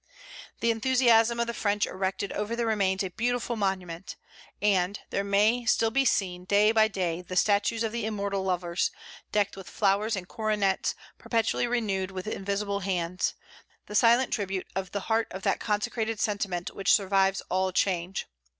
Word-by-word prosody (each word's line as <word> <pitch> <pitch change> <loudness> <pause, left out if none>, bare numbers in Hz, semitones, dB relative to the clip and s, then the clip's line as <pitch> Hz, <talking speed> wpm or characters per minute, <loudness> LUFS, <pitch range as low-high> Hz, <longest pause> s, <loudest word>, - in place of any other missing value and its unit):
The 230 - +3
enthusiasm 235 -1 +3
of 235 - +2
the 235 - -4
French 205 -2 +1
erected 190 +1 -3
over 210 +3 -2
the 235 0 -1
remains 195 -3 +1
a 190 - -4
beautiful 245 +3 -1
monument; 190 -4 -3 0.4
and 200 -1 +1
"there 200 - 0 0.5
still 225 +1 +3
may - - -16
be 275 +1 +3
seen, 180 -6 0
day 205 +3 +4
by 220 -1 +4
day, 180 -5 -2
the 180 +1 -7
statues 205 +4 +2
of 225 - -1
the 235 0 -3
immortal 200 -2 -2
lovers, 180 -1 0 0.4
decked 205 -1 +1
with 195 -1 -10
flowers 210 +2 +1
and 180 -2 -6
coronets, 210 -3 0 0.2
perpetually 230 +1 0
renewed 205 -6 -1
with 185 -1 -6
invisible 200 -1 -2
hands, 180 -2 -1 0.5
the - - -9
silent 235 +4 +4
tribute 195 -3 -2
of 190 -1 -3
the 200 - -3
heart 225 +3 0
of 190 +1 -8
that - - +1
consecrated 220 +1 -1
sentiment 200 -5 -2
which 195 - +1
survives 195 -1 +2
all 185 +1 +1
change. 185 -1 0
200 Hz, 165 wpm, -28 LUFS, 190-225 Hz, 0.5 s, day